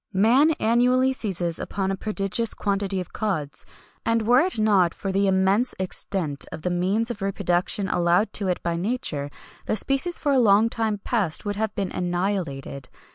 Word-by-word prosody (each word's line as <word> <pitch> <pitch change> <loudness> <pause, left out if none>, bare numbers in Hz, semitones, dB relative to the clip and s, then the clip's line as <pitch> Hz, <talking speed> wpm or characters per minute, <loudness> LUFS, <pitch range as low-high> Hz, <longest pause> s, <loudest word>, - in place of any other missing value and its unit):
"Man 245 +11 +4
annually 250 +1 +2
seizes 180 -8 -1
upon 195 -1 -2
a - - -1
prodigious 210 +2 -1
quantity 195 -1 -1
of 180 - -7
cods, 175 -10 -3 0.4
and 230 -1 +1
were 245 +3 +5
it 360 0 +1
not 200 -5 +3
for 195 - -4
the 195 +1 +1
immense 190 +5 +2
extent 180 -5 -2
of 155 - -8
the 180 - -1
means 195 +7 0
of 210 -3 -8
reproduction 195 0 -1
allowed 175 +4 +1
to 200 - -2
it 180 - -2
by 170 -1 -1
nature, 170 - -3 0.4
the - - +1
species 275 +9 0
for 290 - 0
a 270 - +4
long 220 -1 +4
time 220 -2 -1
past 210 -7 0
would 205 0 -2
have 215 -1 -2
been 195 -2 -2
annihilated. 175 -7 -3
200 Hz, 175 wpm, -24 LUFS, 180-225 Hz, 0.4 s, were